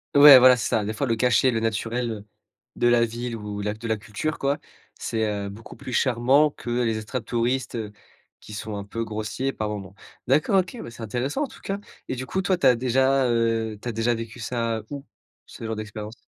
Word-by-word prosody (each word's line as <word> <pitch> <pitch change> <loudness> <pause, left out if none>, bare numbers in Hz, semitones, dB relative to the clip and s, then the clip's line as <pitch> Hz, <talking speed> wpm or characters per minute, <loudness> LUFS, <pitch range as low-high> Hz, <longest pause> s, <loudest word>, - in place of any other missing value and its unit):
Ouais, 145 -2 +11
voilà, 125 0 +7
c'est 110 - -2
ça. 110 - +1
Des 110 - -2
fois, 110 - -1
le 115 -3 +1
cachet, 125 +2 +3
le 115 - 0
naturel, 115 +2 -1
heu, 105 -2 -7 0.5
de 120 - +2
la 120 -1 +5
ville 120 +1 -5
ou 105 -2 -5
la 105 +1 -2
de 115 +2 -7
la 110 - +1
culture 105 +10 -4
quoi, 140 +1 +1 0.4
c'est, 110 -1 -2
heu, 100 -1 -3
beaucoup 105 +3 -11
plus 125 - -8
charmant 130 +5 +4
que 120 -4 -7
les 115 -2 0
extratouristes, 120 +3 -2
heu, 110 -3 -4 0.5
qui 105 - -12
sont 105 0 -5
un 100 - -4
peu 115 +3 -4
grossiers 110 +5 -3
par 110 -1 -3
moment. 100 -2 -6 0.3
D'accord, 150 +9 +3
OK, 180 +5 -9
bah, - - -7
c'est 115 0 -9
intéressant 125 - -2
en - - -2
tout - - -15
cas, 195 - -3 0.3
et - - -2
du 130 +1 -5
coup, 190 +9 -1
toi, 190 -1 +1
tu 155 - -1
as 125 -2 +7
déjà, 130 +2 +2
heu, 115 -2 0
tu 125 - -8
as - - 0
déjà 115 +2 +1
vécu 115 +1 -7
ça 115 -1 -2
où, 140 -1 -7 0.4
ce - - -12
genre 110 0 -3
d'expérience? 105 0 -7
115 Hz, 225 wpm, -25 LUFS, 110-130 Hz, 0.5 s, Ouais